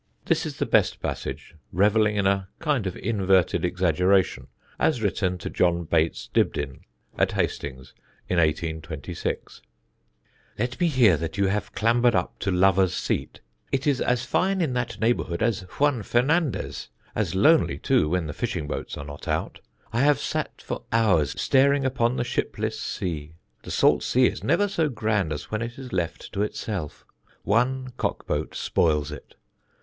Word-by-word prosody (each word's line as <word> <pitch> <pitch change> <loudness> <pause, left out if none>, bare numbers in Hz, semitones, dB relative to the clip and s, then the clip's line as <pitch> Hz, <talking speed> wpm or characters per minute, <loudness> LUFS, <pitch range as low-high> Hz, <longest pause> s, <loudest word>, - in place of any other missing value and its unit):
This - - +1
is - - -7
the - - 0
best - - +2
passage, - - -5 0.2
revelling 105 +2 +3
in 100 -1 +1
a 95 -1 +1
kind 145 - 0
of 90 - -5
inverted 95 -5 +2
exaggeration, 90 +1 +2 0.3
as 155 -6 +2
written 95 -3 0
to 90 - -7
John 85 -1 +1
Bates 80 0 0
Dibdin, 65 0 0 0.4
at - - +2
Hastings, 65 -1 -3 0.3
in 90 - 0
1826: 80 0 -2 1.0
"Let 120 +3 -2
me 175 - +3
hear 120 - +4
that 80 +4 -5
you 100 - +2
have 105 +1 -2
clamber'd 120 +1 +3
up 90 - -1
to - - -1
Lover's 95 0 +3
Seat; - - -3 0.3
it 135 +2 0
is 140 -3 +2
as 125 0 +1
fine 190 +8 +1
in 155 -7 0
that 125 -1 -2
neighbourhood 110 -7 0
as 115 -3 +1 0.2
Juan 145 -5 +2
Fernandez, 135 - 0 0.2
as - - -1
lonely 155 +12 +4
too, 130 - +2
when 90 0 0
the 75 - -5
Fishing 85 -4 -3
boats 75 - -5
are 70 - -6
not 70 0 -9
out; - - -2 0.3
I 115 - +1
have 145 +1 +4
sat - - -4
for - - -4
hours, 95 - +2
staring 140 +1 +3
upon 125 -2 +1
the - - +1
shipless 110 -2 -2
sea. 80 -8 -4 0.3
The - - -11
salt - - +3
sea 130 +1 +3
is - - -1
never 175 +8 +3
so 165 -6 0
grand 110 - 0
as 75 - -5
when 110 0 -1
it 120 +1 -5
is 130 -2 -9
left 90 -3 -3
to 100 - -1
itself. 100 -6 -4 0.4
One 125 +4 +1
cock - - -2
boat 75 +1 -2
spoils 75 -2 +1
it. 75 - -10
105 Hz, 165 wpm, -25 LUFS, 85-125 Hz, 1.0 s, hear